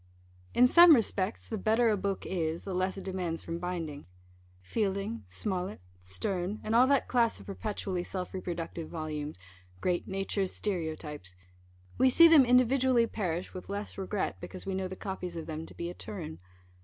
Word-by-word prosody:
In 245 Hz, -, +7 dB
some 340 Hz, +4 st, +9 dB
respects 210 Hz, -3 st, -1 dB
the 220 Hz, -, -3 dB
better 225 Hz, +3 st, +3 dB
a -, -, +3 dB
book 195 Hz, -1 st, -2 dB
is, 165 Hz, -2 st, -2 dB
the 195 Hz, -, -4 dB
less 185 Hz, +1 st, 0 dB
it 195 Hz, -, -6 dB
demands 180 Hz, -3 st, -3 dB
from 165 Hz, 0 st, -4 dB
binding. 165 Hz, -5 st, -4 dB, 0.6 s
Fielding, 195 Hz, -, -2 dB
Smollet, 180 Hz, -, -3 dB, 0.2 s
Sterne, 175 Hz, -, -3 dB
and 215 Hz, -, -2 dB
all 245 Hz, +3 st, +6 dB
that 280 Hz, 0 st, +3 dB
class 235 Hz, -2 st, +2 dB
of -, -, -12 dB
perpetually 195 Hz, -3 st, -3 dB
self 180 Hz, 0 st, -4 dB
reproductive 170 Hz, -3 st, -4 dB
volumes 155 Hz, -, -4 dB, 0.4 s
Great 175 Hz, -, 0 dB
Nature's 195 Hz, 0 st, -1 dB
Stereotypes 155 Hz, -, -4 dB, 0.6 s
we 260 Hz, -, +6 dB
see 335 Hz, +6 st, +8 dB
them 315 Hz, -5 st, +7 dB
individually 250 Hz, 0 st, +4 dB
perish 180 Hz, -6 st, -3 dB
with 185 Hz, -, -8 dB
less 205 Hz, +1 st, -4 dB
regret, 195 Hz, +1 st, -2 dB
because 185 Hz, -, -8 dB
we 195 Hz, -, -2 dB
know 190 Hz, 0 st, -1 dB
the 190 Hz, -, -7 dB
copies 190 Hz, -3 st, -5 dB
of 165 Hz, -, -5 dB
them 160 Hz, 0 st, -5 dB
to -, -, -13 dB
be 170 Hz, -, -4 dB
"eterne." 105 Hz, -, -7 dB
190 Hz, 170 wpm, -30 LUFS, 165-215 Hz, 0.6 s, some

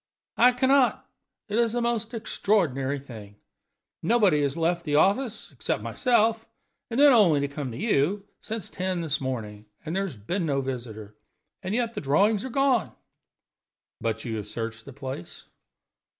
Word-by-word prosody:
"I 250 Hz, +1 st, +6 dB
can 260 Hz, +1 st, +1 dB
not. 270 Hz, -2 st, +3 dB, 0.4 s
It 215 Hz, +2 st, 0 dB
is 235 Hz, -1 st, +2 dB
a -, -, +1 dB
most 235 Hz, 0 st, -1 dB
extraordinary 160 Hz, -, 0 dB
thing. 110 Hz, -7 st, -11 dB, 0.7 s
Nobody 190 Hz, -6 st, +3 dB
has 140 Hz, +2 st, -1 dB
left 170 Hz, +1 st, 0 dB
the 150 Hz, -3 st, -1 dB
office 210 Hz, -, +1 dB
(except -, -, -3 dB
myself, 225 Hz, -3 st, +1 dB, 0.4 s
and 235 Hz, +2 st, -2 dB
then 290 Hz, -1 st, +8 dB
only 185 Hz, -11 st, +5 dB
to 140 Hz, -, 0 dB
come 140 Hz, -1 st, -5 dB
to 115 Hz, -, -7 dB
you) 195 Hz, -, +1 dB
since 220 Hz, -3 st, -6 dB
ten 185 Hz, -1 st, -2 dB
this 155 Hz, -4 st, -1 dB
morning, 110 Hz, -5 st, -5 dB, 0.2 s
and 160 Hz, +2 st, -3 dB
there 195 Hz, -, +1 dB
has 145 Hz, -, -9 dB
been 175 Hz, -, -2 dB
no 140 Hz, -2 st, +1 dB
visitor. 115 Hz, -5 st, -6 dB, 0.5 s
And 190 Hz, +2 st, -2 dB
yet 235 Hz, -1 st, 0 dB
the -, -, -4 dB
drawings 195 Hz, +9 st, +2 dB
are 260 Hz, -, -5 dB
gone!" 270 Hz, -2 st, +1 dB, 1.1 s
"But 115 Hz, -1 st, -2 dB
have -, -, -12 dB
you 110 Hz, -1 st, -2 dB
searched 115 Hz, +2 st, -6 dB
the 140 Hz, -, -9 dB
place?" 130 Hz, -10 st, -7 dB
170 Hz, 165 wpm, -26 LUFS, -, 1.1 s, then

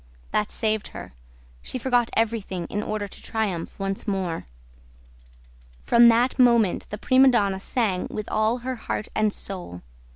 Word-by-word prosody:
That 210 Hz, 0 st, 0 dB
saved 215 Hz, -2 st, -1 dB
her. -, -, -9 dB, 0.5 s
She -, -, -5 dB
forgot 245 Hz, -2 st, +1 dB
everything, 215 Hz, -6 st, -1 dB
in 205 Hz, -, -1 dB
order 215 Hz, -1 st, -3 dB
to -, -, -12 dB
triumph 205 Hz, -7 st, -3 dB
once 195 Hz, +2 st, -3 dB
more. 185 Hz, -, -2 dB, 1.4 s
From 235 Hz, 0 st, +6 dB
that 240 Hz, +3 st, +3 dB
moment 235 Hz, -6 st, +3 dB
the 210 Hz, -, -5 dB
prima 260 Hz, +5 st, +5 dB
donna 200 Hz, -6 st, +2 dB
sang 195 Hz, -3 st, -1 dB
with 215 Hz, -1 st, -5 dB
all 215 Hz, +2 st, +2 dB
her 260 Hz, -1 st, -2 dB
heart 220 Hz, -, -4 dB
and 215 Hz, -1 st, +2 dB
soul. 180 Hz, -, -7 dB
215 Hz, 150 wpm, -24 LUFS, 195-235 Hz, 1.4 s, From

